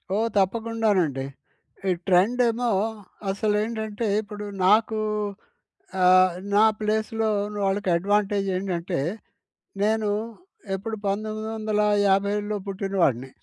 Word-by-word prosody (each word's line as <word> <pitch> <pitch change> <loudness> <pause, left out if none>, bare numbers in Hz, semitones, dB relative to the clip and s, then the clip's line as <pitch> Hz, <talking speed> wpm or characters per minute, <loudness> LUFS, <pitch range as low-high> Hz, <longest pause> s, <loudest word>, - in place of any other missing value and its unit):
ఓ - - +1 0.2
తప్పకుండా 225 +3 +1
నండి, 135 -6 -1 0.6
ఈ - - +4 0.2
ట్రెండ్ 195 +7 +3
ఏమో 240 +1 -1 0.6
అసలు 210 +2 0
ఏంటంటే 220 0 -3
ఇప్పుడు 210 0 -8 0.2
నాకు, 215 +2 +4 1.0
ఆహ్, 185 0 +6 0.2
నా 210 - +6 0.2
ప్లేస్‌లో 220 +1 0 0.4
వాళ్ళకి 195 0 0
అడ్వాంటేజ్ 200 +1 +1
ఏంటంటే, 180 -2 -2 0.8
నేను 215 0 +1 0.7
ఎప్పుడు 220 +3 -4
1957లో 210 -1 0
పుట్టిన 195 0 -4
వాడిని. 130 -2 +1
205 Hz, 95 wpm, -25 LUFS, 195-220 Hz, 1.0 s, ఆహ్